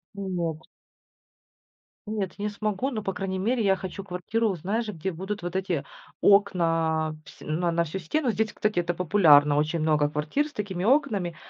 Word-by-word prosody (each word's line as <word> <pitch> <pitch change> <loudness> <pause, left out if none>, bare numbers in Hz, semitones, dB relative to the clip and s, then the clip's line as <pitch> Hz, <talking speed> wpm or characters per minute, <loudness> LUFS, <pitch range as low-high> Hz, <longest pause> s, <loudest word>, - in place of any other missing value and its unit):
Ну, 200 -1 -5
нет. 165 -3 -2 1.4
Нет, 210 -4 -3
я 205 - -5
не - - 0
смогу. 215 +4 -2
Но, 215 -3 -3
по 195 -2 -3
крайней 190 -1 -3
мере, 230 +3 +1
я 195 -1 +4
хочу 190 +1 -6
квартиру, 200 +4 -1
знаешь, 215 +7 -2
где 190 0 -3
будут 190 +4 -5
вот 175 +1 -5
эти 185 -6 -1 0.4
окна, 165 -6 +3
вс - - -14
на 170 +3 -1
на 170 0 +2
всю 180 +5 -5
стену. 255 - -1
Здесь, 220 0 -1
кстати, 210 -4 0
это 175 0 0
популярно, 155 -5 +5
очень 155 +3 0
много 150 -2 +2
квартир 150 - -1
с 295 - -15
такими 190 -3 -4
окнами. 215 - +2
185 Hz, 180 wpm, -26 LUFS, 165-210 Hz, 1.4 s, популярно